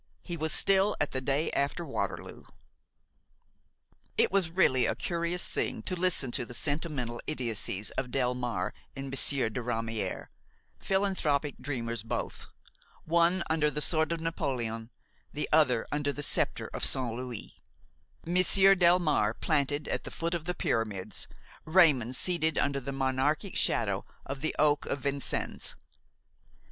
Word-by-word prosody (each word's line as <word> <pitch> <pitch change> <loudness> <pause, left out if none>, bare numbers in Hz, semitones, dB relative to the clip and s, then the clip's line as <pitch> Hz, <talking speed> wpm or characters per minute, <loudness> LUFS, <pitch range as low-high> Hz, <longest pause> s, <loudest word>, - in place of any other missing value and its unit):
He 175 - -4
was 160 -1 -1
still 195 +4 +3
at 150 - 0
the 130 - -2
day 140 +4 0
after 140 +5 -1
Waterloo. 140 - -4 1.7
It - - +3
was 190 -4 +2
really 130 -8 +3
a - - 0
curious 170 0 -1
thing - - -2
to 185 - -2
listen 175 -8 +1
to 130 - 0
the 120 0 -7
sentimental 145 -3 -1
idiocies 115 -7 -2
of 130 -1 -3
Delmare 125 -6 -1 0.2
and 135 -1 -5
Monsieur 135 -2 +2
de 110 +3 -4
Ramière, 115 -5 -3 0.5
philanthropic 175 -8 0
dreamers 115 -5 -3
both, 110 - -4 0.6
one 170 +3 +3
under 155 -2 +2
the 150 - -3
sword 160 +1 +2
of 170 - -1
Napoléon, 125 -9 -2 0.4
the 150 - -1
other 135 -7 +4
under 145 -1 0
the 145 +1 -4
sceptre - - 0
of - - -4
Saint 125 -3 +2
Louis; 125 -2 -7 0.6
Monsieur 185 +3 +5
Delmare 170 - +3
planted 145 -1 +1
at - - -2
the - - -6
foot 170 +1 -2
of 170 -2 -3
the 180 0 -2
Pyramids, 105 -9 -1 0.4
Raymon 155 -8 +4
seated 160 +2 +1
under 140 -1 +1
the 140 +1 -5
monarchic 135 +7 0
shadow 100 -4 +1 0.2
of 135 0 -5
the 155 - -1
oak 145 -1 +3
of 140 - -2
Vincennes. 140 0 -2
145 Hz, 140 wpm, -30 LUFS, 125-165 Hz, 1.7 s, Monsieur